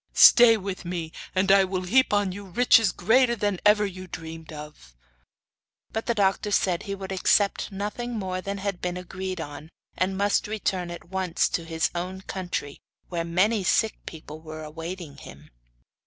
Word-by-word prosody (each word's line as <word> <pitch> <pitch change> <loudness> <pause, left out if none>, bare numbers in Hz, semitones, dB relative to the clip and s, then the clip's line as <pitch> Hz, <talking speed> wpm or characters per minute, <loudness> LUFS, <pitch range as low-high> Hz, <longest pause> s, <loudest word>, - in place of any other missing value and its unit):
'Stay 235 -2 +8
with 195 -2 -5
me, 170 -2 -4 0.2
and 190 +1 +3
I 195 0 +7
will 185 -1 -2
heap 255 +9 +3
on 205 -2 +2
you 200 +2 -8
riches 225 +2 +4
greater 240 +1 +3
than 205 -4 -1
ever 210 0 +5
you 185 -1 -7
dreamed 160 -1 -8
of.' 150 - -11 1.0
But 220 - -4
the 235 - +1
doctor 200 0 +1
said 185 -3 +1
he 200 - -4
would 195 -1 -7
accept 200 +2 +2
nothing 210 +4 -4
more 185 -2 -3
than 200 +1 -4
had 195 -2 -4
been 180 0 -2
agreed 185 0 -5
on, 145 0 -7 0.3
and 190 +1 -1
must 205 +1 +1
return 195 -4 -2
at 170 0 -9
once 185 -2 0
to 170 - -2
his 165 -1 -1
own 180 +2 -4
country, 180 -7 -5 0.3
where 170 -2 -2
many 190 +5 +1
sick 220 +4 +2
people 155 -1 -9
were 155 0 -8
awaiting 165 0 -7
him. - - -13
190 Hz, 170 wpm, -26 LUFS, 170-205 Hz, 1.0 s, Stay